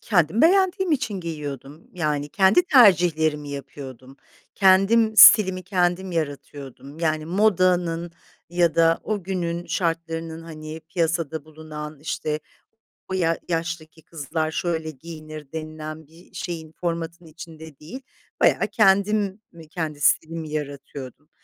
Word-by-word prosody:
Kendim 180 -1 +1
beğendiğim 375 0 +3
için 235 -9 -1
giyiyordum, 150 -2 -7
yani, 150 -4 -2
kendi 195 - +4
tercihlerimi 170 - +4
yapıyordum. 135 -2 -9 0.4
Kendim 205 +4 +4
stilimi 190 -5 +8
kendim 180 -1 0
yaratıyordum, 145 -2 -6
yani, 155 -2 -1
modanın 180 -3 +1 0.4
ya 170 -2 +1
da 165 0 +3
o 210 -2 -3
günün 175 -2 -3
şartlarının, 165 -1 -3
hani, 155 -1 -9
piyasada 165 -3 -1
bulunan, 155 -1 -9
işte, 155 0 -3 0.7
"O - - -5
ya 165 -3 +1
yaştaki 165 -1 -4
kızlar 155 0 -3
şöyle 160 -1 -2
giyinir." 155 -1 -10
denilen 155 -1 -7
bir 165 +3 -20
şeyin, 165 -3 -6
formatın 170 0 -4
içinde 160 -2 -12
değil, 185 - -9 0.4
bayağı - - +3
kendim 200 0 +2
mi 165 -2 -14
kendi 155 -3 -5
stilimi 160 +1 +1
yaratıyordum 140 -1 -7
165 Hz, 115 wpm, -23 LUFS, 155-180 Hz, 0.7 s, stilimi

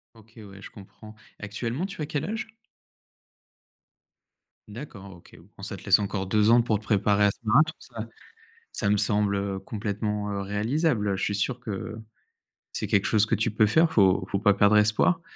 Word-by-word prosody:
OK 110 0 -20
ouais, 100 -2 -12
je - - -11
comprends. 100 +2 -14 0.3
Actuellement, 115 - -4
tu 195 -5 -7
as - - -1
quel 145 -1 -3
âge? 225 +3 -4 2.2
D'accord, 105 -4 -10
OK. 85 - -18 0.2
Bon, - - -12
ça 100 -1 -5
te - - -14
laisse 100 0 +4
encore 100 -1 -3
2 105 +3 +2
ans 120 +1 +6
pour 110 -4 0
te - - -17
préparer 105 -1 +2
à 100 - +3
ce - - -17
marathon, 155 +9 +3
ça 115 -3 -8 0.7
ça 100 - -1
me 105 - +3
semble, 105 0 +2
heu, 100 -1 -3
complètement, 105 0 -4
heu, 100 -1 -3
réalisable. 105 - 0
Heu, 95 - 0
je - - -5
suis 100 - -1
sûr 120 +5 -2
que 110 -1 -6 0.8
c'est - - -3
quelque 100 -1 +1
chose 110 0 +3
que - - +1
tu 115 +1 0
peux 110 0 +3
faire, 160 +9 +3
faut 95 -2 +3
faut 100 - 0
pas 105 0 +4
perdre 100 +1 +4
espoir, 110 +11 +2
105 Hz, 190 wpm, -26 LUFS, 100-115 Hz, 2.2 s, ans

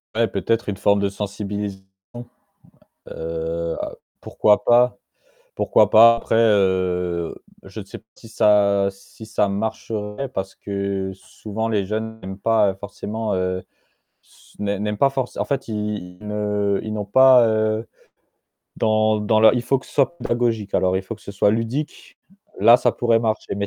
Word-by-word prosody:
Ouais 115 0 +2
peut-être 110 +4 -1
une 100 - -4
forme 100 0 +2
de 100 - +1
sensibilisation. 100 -1 -5 1.3
Heu, 80 +1 -4 0.4
pourquoi 105 -1 +2
pas 120 +1 +4 0.6
pourquoi 105 -1 +3
pas. 115 +1 +8
Après, 115 - -2
heu, 95 -5 +1 0.3
je - - -9
sais - - -10
pas - - -27
si 115 - -14
ça 100 -2 +3
si 105 +3 -15
ça 105 -2 0
marcherait 110 +3 -4
parce 95 -5 -5
que 100 -1 -3
souvent 110 +3 -6
les 105 -3 0
jeunes 110 +2 -4
n'aiment 95 +1 -8
pas, 110 -1 +2
heu, - - -6
forcément 105 +2 -4
heu, 95 0 -2 1.0
n'aiment 100 0 -2
n'aiment 105 0 -2
pas 135 +5 +4
for 130 -2 -2
en - - -1
fait 140 -3 -3
ils 105 -4 -4
ne 105 -1 -1
ils 110 -1 -5
n'ont 105 - -3
pas, 130 +2 +6
heu, 110 0 0 0.9
dans 110 -1 +2
dans 110 +1 +2
leur 110 - +6
il 120 - -1
faut 135 +2 +1
que - - -16
ce - - -16
soit 145 +4 +1
pédagogique, 115 -4 -1
alors, 95 0 +2
il 95 - -2
faut 115 - -6
que 105 - -19
ce - - -8
soit 100 +1 +2
ludique, 115 +7 -4 0.4
là 115 +4 +7
ça - - +1
pourrait 115 -1 +1
marcher 110 -3 -2
mais 100 0 -2
105 Hz, 160 wpm, -21 LUFS, 100-115 Hz, 1.3 s, pas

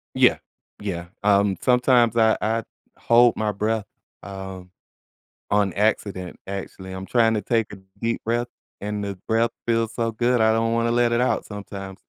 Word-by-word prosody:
Yeah. - - +5 0.4
Yeah, 85 -4 -4
um, 100 -1 +3
sometimes 125 -2 +3
I 110 -1 +4
I 115 +1 0 0.3
hold 120 0 +4
my 105 -1 0
breath, 105 +1 -1 0.4
um, 95 -1 -8 0.8
on 100 -2 +2
accident, 100 -3 -1
actually, 95 -1 -7
I'm 95 0 -7
trying 115 -2 +3
to 105 - 0
take 115 0 0
a 100 - -8 0.2
deep 115 0 -2
breath, 120 +2 0 0.3
and 105 0 -3
the 100 -1 -4
breath 115 +1 +2 0.2
feels 115 -1 0
so 115 -1 0
good, 120 +2 +1
I 110 0 +5
don't 115 0 +1
wanna 115 0 +1
let 120 0 +2
it 120 - +2
out 125 - +1
sometimes. 100 -2 -8
110 Hz, 165 wpm, -23 LUFS, 100-115 Hz, 0.8 s, Yeah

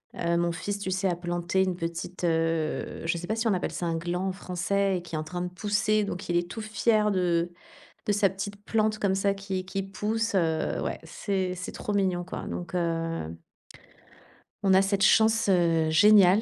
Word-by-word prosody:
hein, 170 0 -1
heu, - - +3
mon 170 0 +1
fils, 200 +4 -4
tu 200 - -3
sais, 190 +1 0
a 175 - +1
planté 175 +2 0
une 185 -1 -1
petite, 170 +1 -5
heu 165 -1 -1
je 165 +1 0
sais 175 +1 -6
pas 220 - 0
si 225 +1 0
on 215 - +3
appelle 180 - -1
ça 175 - -3
un 165 -1 0
gland 175 +3 -2
en - - 0
français 190 +1 0
et - - -5
qui 175 - -13
est - - 0
en - - -3
train 175 +3 -5
de 180 - -2
pousser. 210 +3 +1
Donc 190 0 -5
il 175 - +1
est 175 0 -1
tout 220 - -5
fier 215 0 +2
de 175 -2 +1 0.6
de 210 - +2
sa 205 -1 +3
petite 200 +2 -6
plante 215 0 +1
comme 195 -2 +2
ça 200 +1 +2
qui 195 -2 -4
qui 195 +1 -3
pousse, 210 +3 -2
heu, 160 -3 0
ouais, - - -3
c'est 190 -3 -2
c'est 180 - -6
trop 210 - -4
mignon 185 -3 +1
quoi, 180 - -6
donc 175 +1 -5
heu 165 - -2 1.3
on 195 -1 +4
a 190 - +7
cette 195 0 +1
chance, 220 -1 +4
heu, 165 -3 +3
géniale 200 +3 +6
185 Hz, 215 wpm, -27 LUFS, 175-200 Hz, 1.3 s, a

